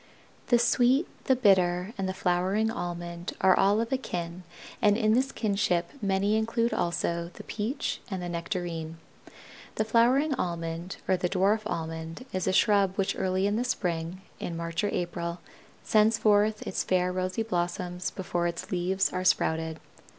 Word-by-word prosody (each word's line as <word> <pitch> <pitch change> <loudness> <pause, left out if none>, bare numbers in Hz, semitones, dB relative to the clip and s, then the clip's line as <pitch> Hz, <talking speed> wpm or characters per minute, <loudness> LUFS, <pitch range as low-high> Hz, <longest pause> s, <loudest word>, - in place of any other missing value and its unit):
The 240 - +5
Sweet, 245 +5 +3 0.2
the 260 - +4
Bitter, 185 -3 +3
and 195 -1 -2
the - - -2
Flowering 190 +5 +1
Almond 175 -2 -5
are 190 -1 +5
all 200 +2 +3
of 230 +2 -2
a 260 - +1
kin 175 -6 -5 0.4
and 205 0 +4
in 215 -2 +3
this 265 +3 +2
kinship 195 -5 0
many 200 +1 +1
include 230 +2 +1
also 170 0 -1
the - - -9
Peach 225 +6 -3
and 190 -3 -3
the 175 - -4
Nectarine. 170 -2 -4 0.8
The 220 - 0
Flowering 250 +7 +3
Almond 170 -3 -3
or 185 - +3
the 180 0 -1
dwarf 195 +3 +2
Almond 165 +6 -5
is 185 0 -1
a - - +3
shrub 195 -1 +3
which 195 -1 0
early 190 +1 0
in 205 +1 +1
the 240 - +1
spring, 175 -6 -2 0.2
in 170 - -4
March 165 +2 -3
or 205 - +1
April, 170 0 -3 0.4
sends 215 0 +4
forth 210 0 +3
its - - -2
fair 180 -1 +1
rosy 185 +4 -1
blossoms 180 -2 -2
before 175 -2 -2
its 170 -1 -5
leaves 185 +1 0
are 185 0 -1
sprouted. 160 -3 +1
185 Hz, 165 wpm, -28 LUFS, 175-215 Hz, 0.8 s, The